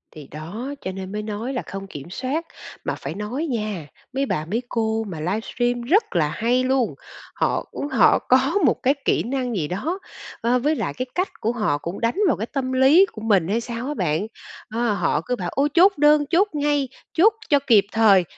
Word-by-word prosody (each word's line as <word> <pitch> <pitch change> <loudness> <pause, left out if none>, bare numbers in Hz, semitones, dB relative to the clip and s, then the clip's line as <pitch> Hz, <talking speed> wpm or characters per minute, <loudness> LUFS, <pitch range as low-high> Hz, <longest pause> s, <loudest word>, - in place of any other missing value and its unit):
Thì 150 -3 -10
đó, 205 - -6
cho 185 - -4
nên 190 0 -7
mới 210 +1 -3
nói 220 +5 -4
là 250 - -2
không 195 0 -7
kiểm 145 -1 -9
soát, 270 - -3 0.4
mà - - -2
phải - - -6
nói 235 +10 -3
nha, 210 - -3 0.3
mấy 270 +1 0
bà 155 - -2
mấy 220 +8 -1
cô 225 -1 0
mà 170 -5 -6
livestream 230 +7 -1
rất 320 - +2
là 155 -3 +2
hay 245 +8 +1
luôn, 260 -2 +1 0.4
họ, - - 0
ừm, 285 - -4
họ - - +5
có - - +2
một - - +1
cái 270 - +4
kỹ - - +2
năng 250 -1 -2
gì 155 -6 -1
đó, 310 - -3 0.4
a, 240 +2 +2
với 295 +5 +1
lại - - -2
cái 255 - -2
cách 365 +2 0
của 225 - +1
họ 215 -11 0
cũng 170 +5 -6
đánh 230 +6 +1
vào 265 - +2
cái 220 - -2
tâm 265 -2 -1
lý 270 +8 +6
của 215 - -9
mình 200 -7 +2
hay 220 +5 0
sao 235 +2 -5
á 295 - -2
bạn. 180 - -1 0.5
Ơ, 235 -1 +1
họ 170 -5 0
cứ 250 - 0
bảo: 180 -6 -4
"Ôi, 280 +2 +2
chốt 380 +3 +5
đơn, 295 0 +5
chốt 370 +5 +4
ngay, 290 -2 0 0.2
chốt 405 +7 +5 0.2
cho 285 -1 +5
kịp 215 -6 +6
thời!" 205 -5 +5
235 Hz, 215 wpm, -23 LUFS, 195-275 Hz, 0.5 s, lý